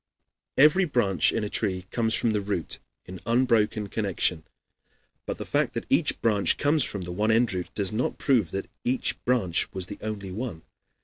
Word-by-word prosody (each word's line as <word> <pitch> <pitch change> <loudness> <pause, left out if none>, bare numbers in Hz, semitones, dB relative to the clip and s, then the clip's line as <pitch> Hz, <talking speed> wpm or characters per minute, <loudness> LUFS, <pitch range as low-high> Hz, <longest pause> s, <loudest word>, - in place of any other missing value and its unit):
Every 155 +7 +6
branch 100 - +2
in 115 - -1
a - - -1
tree 95 -5 -2
comes 115 -1 +1
from 115 - +2
the 105 -1 0
root 100 -5 -2 0.3
in 90 -1 -9
unbroken 115 -3 +2
connection; 95 -6 -1 0.8
but - - -3
the - - -6
fact - - 0
that - - -3
each - - +2
branch 105 -4 +3
comes 145 0 +2
from 100 - -2
the 90 - -6
one 105 +5 0
root, 110 -6 +1
does 100 -3 +2
not 110 +4 -1
prove 120 - +2
at 80 - -8
all 95 - 0
that - - -26
each 125 +1 -1
branch 115 -9 +1
was 95 -1 0
the 100 +2 -9
only 105 -3 -5
one. 105 -5 -5
105 Hz, 190 wpm, -26 LUFS, 95-120 Hz, 0.8 s, Every